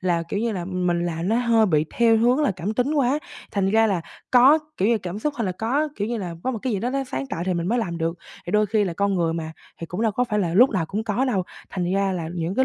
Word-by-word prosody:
Là, 175 -2 +1
kiểu, 200 - -2
như 230 -1 0
là 180 -3 -3
mình 180 -2 -1
làm 170 +2 -3
nó 225 - +2
hơi 230 -3 +3
bị 155 -4 +2
theo 230 -1 +5
hướng 245 +5 +3
là 290 - +2
cảm 200 +5 -3
tính 265 +6 0
quá. 280 +1 +2 0.3
Thành 195 -1 0
ra 225 +1 +4
là 195 -5 0 0.3
có, 260 +5 +7 0.2
kiểu, 200 - +2
như 230 -2 +3
cảm 185 +1 -5
xúc 295 +5 -2
hay 230 - -1
là 185 - -1
có, 255 +11 0
kiểu, 205 +2 -2
như 240 - -2
là 180 -5 -4
có 260 - +1
một 230 - -3
cái 255 - -1
gì 200 - 0
đó 245 - -1
nó 275 0 -1
sáng 135 - -4
tạo 165 - -4
thì 185 - +1
mình 170 0 -2
mới 240 +2 +1
làm 170 -7 -2
được. 165 +1 -2 0.3
Thì 175 - -4
đôi 210 0 +3
khi 210 0 +1
là 180 - -2
con 200 +3 0
người 165 -2 +1
mà 160 -1 -4 0.3
thì 165 - -5
cũng 180 +7 -4
đâu 220 -2 +2
có 250 +4 +1
phải 210 -3 -1
là 170 -4 0
lúc 245 +7 +6
nào 185 -7 -1
cũng 210 +6 -3
có 225 +4 0
đâu. 220 -8 0 0.3
Thành 180 -1 -2
ra 195 -1 +1
là 170 -3 -3
những 170 +2 -2
cái 260 +4 +3
200 Hz, 310 wpm, -23 LUFS, 175-235 Hz, 0.3 s, có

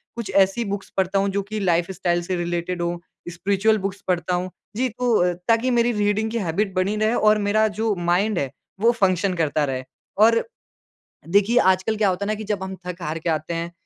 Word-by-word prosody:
कुछ 235 -4 -5
ऐसी 195 +4 +3
बुक्स 200 -1 -4
पढ़ता 190 +1 +2
हूँ 200 0 +1
जो 200 +1 -1
कि 215 +2 -5
लाइफ़स्टाइल 175 -1 0
से 185 +2 -2
रिलेटेड 175 +1 -2
हों, 170 0 -1 0.3
स्पिरिचुअल 200 +5 +1
बुक्स 195 0 -4
पढ़ता 180 -1 0
हूँ। 180 +1 -2 0.3
जी, 255 +4 +1
तो, 225 -6 +1
ताकि 230 +2 +3
मेरी 240 0 +3
रीडिंग 210 0 0
की 235 - -2
हैबिट 195 0 -1
बनी 185 +3 +1
रहे 215 +2 +2
और 215 -1 +4
मेरा 215 +1 +3
जो 220 -1 +1
माइंड 175 +3 +1
है, 135 -2 -2 0.3
वो 230 +3 +5
फ़ंक्शन 195 -4 +1
करता 155 -3 +1
रहे। 130 -2 -3 0.3
और, 225 +2 +5 0.9
देखिए 205 +6 +3
आजकल 190 +4 -1
क्या 210 -2 +3
होता 185 +2 -2
है - - -4
ना 215 - +1
कि 215 - -7
जब 195 -2 -4
हम 190 0 -5
थक-हार 170 -3 -4
के 165 - -2
आते 155 +1 -1
हैं, 170 +1 -3
195 Hz, 205 wpm, -23 LUFS, 175-215 Hz, 0.9 s, वो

